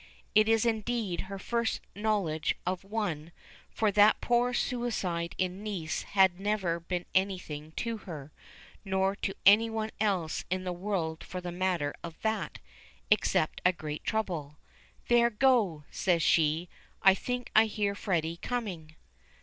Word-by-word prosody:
It 215 +1 +5
is 225 0 +3
indeed 225 -4 -1
her 195 - -5
first 235 +3 -1
knowledge 200 -7 0
of 185 0 -2
one, 195 -7 -3 0.4
for 215 -2 +1
that 210 +1 +5
poor 245 +1 +2
suicide 220 -9 -2
in 185 +2 -2
Nice 180 -7 -3 0.2
had 190 -2 +5
never 195 -4 0
been 175 +1 -3
anything 180 -6 -1
to 230 +4 -3
her 155 -8 -9 0.5
or 190 0 +1
to 195 - -3
any 215 +3 +7
one 220 -1 -3
else 190 -7 0
in 185 +1 -1
the 180 -1 -2
world 175 -4 -2
for 185 - -6
the 180 -1 -5
matter 175 -5 0
of 165 -1 -8
that 220 0 -1 0.5
except 190 -6 +2
a 180 - +5
great 155 -4 -6
trouble. 170 -10 -2 0.5
"There, 240 0 +5
go," 215 - +2
says 175 -3 +1
she. 160 +2 +3 0.4
"I 195 - +8
think 245 +5 -4
I 220 +1 +8
hear 205 -1 -1
Freddy 170 -5 -1
coming." 180 -10 -4
190 Hz, 145 wpm, -30 LUFS, 170-220 Hz, 0.5 s, I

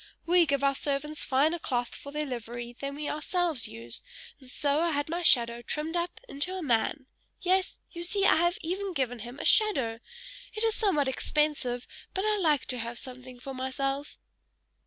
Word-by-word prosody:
We 345 0 +5
give 280 0 +1
our 275 0 +4
servants 290 +2 -1
finer 300 +6 +2
cloth 245 -6 -1
for 280 - -9
their 300 +1 -2
livery 240 -1 -5
than 280 0 -4
we 295 0 -4
ourselves 315 -3 +1
use, 115 +1 -4 0.4
and 260 -2 -15
so 285 +3 +1
I 340 - +2
had 290 +1 -1
my 340 +2 -1
shadow 235 -7 +4
trimmed 305 +7 -2
up 345 0 -2
into 345 +2 -3
a 365 - -4
man: 255 +2 +1 0.3
yes, 375 +1 +2
you 340 - -6
see 390 +3 +2
I - - +6
have 345 +2 +2
even 375 +3 -2
given 245 -5 -1
him 240 +4 -8
a - - -5
shadow. 265 - +4 0.6
It 430 - -2
is 450 -1 +3
somewhat 365 - +2
expensive, 265 -3 0 0.3
but 380 +2 0
I 425 -1 +2
like 305 -6 +3
to 250 -2 -1
have 235 +1 -4
something 255 0 -6
for 270 +2 -6
myself!" 270 +2 -2
285 Hz, 185 wpm, -29 LUFS, 255-340 Hz, 0.6 s, I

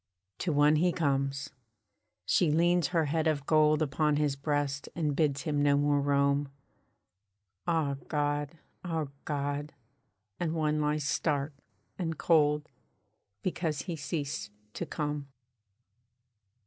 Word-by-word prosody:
To 175 - 0
one 150 +1 +4
he 175 +3 +3
comes! 140 -3 -1 0.7
She 175 - +3
leans 175 +3 +3
her 170 -3 +1
head 160 +2 0
of 145 -3 0
gold 155 0 +4
Upon 150 +1 +1
his 145 -2 +1
breast 140 0 -1
and 150 -4 0
bids 140 -3 +1
him 145 -2 0
no 145 0 +4
more 145 0 +2
roam. 140 0 +2 1.2
Ah 155 -5 +1
God! 145 +1 -1 0.3
Ah 160 -5 -2 0.2
God! 145 0 -2 0.7
and 165 -2 -1
one 155 -1 +1
lies 150 0 0
stark 140 +1 0 0.5
and 165 -3 -2
cold, 150 -2 +3 0.8
Because 165 -4 -1
he 175 -3 -4
ceased 145 -1 -3 0.2
to - - -4
come. 150 -2 -3
150 Hz, 120 wpm, -30 LUFS, 145-160 Hz, 1.2 s, one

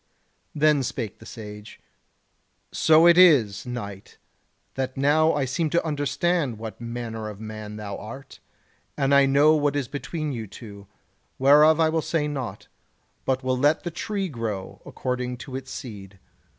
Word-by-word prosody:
Then 150 -1 +3
spake 120 -3 -4
the - - -13
Sage: 105 -1 -10 0.9
"So 160 +1 +5
it 170 +1 +7
is, 125 - +5
Knight, 100 -6 -7 0.6
that 130 0 -3
now 155 +4 +3
I 145 -2 0
seem 155 +5 -1
to 170 - +1
understand 145 -2 0
what 110 -1 -8
manner 115 -2 -5
of 105 -1 -10
man 110 -1 -7
thou 105 -2 -6
art, 125 +6 -10 0.6
and 140 -1 +2
I 140 0 +6
know 145 +3 +5
what 145 -2 +1
is 140 -4 -1
between 150 +3 -4
you 115 -3 -5
two; 100 -1 -12 0.5
whereof 150 +4 +6
I 160 -1 +4
will 160 0 0
say 155 -1 -1
naught, 135 -5 -5 0.6
but 130 0 0
will 130 0 +1
let 145 +3 +2
the 175 - -4
tree 195 +3 -3
grow 115 - -5
according 125 -1 -3
to 130 - -8
its 130 0 -6
seed. 100 -5 -9
130 Hz, 155 wpm, -25 LUFS, 110-150 Hz, 0.9 s, it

